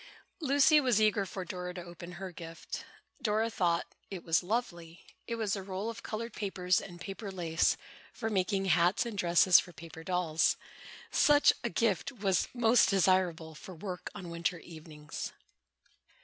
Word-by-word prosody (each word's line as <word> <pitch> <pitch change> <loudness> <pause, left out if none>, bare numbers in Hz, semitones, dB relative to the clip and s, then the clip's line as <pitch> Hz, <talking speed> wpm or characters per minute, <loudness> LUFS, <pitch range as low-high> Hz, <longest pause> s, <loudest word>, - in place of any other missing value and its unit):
Lucy 295 0 +5
was 250 -5 +3
eager 215 -2 +2
for 185 0 -6
Dora 180 0 -5
to 180 - -6
open 175 +1 -10
her 190 +1 -7
gift. 165 -2 -8 0.4
Dora 220 -1 +1
thought 170 -4 +1 0.2
it 190 -3 -7
was 165 -1 +2
lovely. 175 -5 -4 0.2
It 235 - -2
was 220 -3 -1
a 195 - -4
roll 190 +3 -4
of 230 - -10
colored 230 +1 -5
papers 185 -3 0
and 175 -2 -10
paper 195 +3 -6
lace, 170 -3 +1 0.3
for 225 - -4
making 195 0 0
hats 175 +5 +3
and 235 -3 -5
dresses 175 -1 +6
for 175 - -7
paper 160 +1 -11
dolls. 175 -3 +1 0.5
Such 290 0 +5
a 235 - 0
gift 225 +2 0
was 195 -8 0
most 240 -3 +4
desirable 185 -4 +2
for 175 +4 -11
work 180 +1 -6
on 180 -4 -7
winter 170 +1 -1
evenings. 155 -3 -8
185 Hz, 160 wpm, -31 LUFS, 170-215 Hz, 0.5 s, dresses